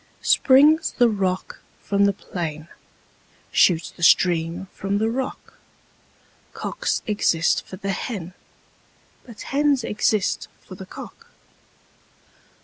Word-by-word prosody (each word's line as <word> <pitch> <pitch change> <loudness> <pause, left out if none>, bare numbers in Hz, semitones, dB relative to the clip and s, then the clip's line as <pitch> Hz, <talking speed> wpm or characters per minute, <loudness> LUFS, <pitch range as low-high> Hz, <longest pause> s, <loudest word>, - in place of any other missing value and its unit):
Springs 295 +4 +4
the 245 - +5
rock 190 -4 -2 0.2
from 200 0 +1
the 200 - +2
plain, 160 -5 -6 0.8
shoots 165 -3 +3
the - - -16
stream 170 +1 +3
from 195 +1 -2
the 220 +2 0
rock: 265 +2 -5 0.9
Cocks - - -3
exist 185 -6 +1
for - - -8
the 195 +1 -3
hen: 185 -3 -5 0.9
but 235 -3 -11
hens 280 -2 +1
exist 210 -2 0 0.2
for - - -11
the 190 0 -10
cock. - - -11
200 Hz, 110 wpm, -22 LUFS, 180-235 Hz, 0.9 s, the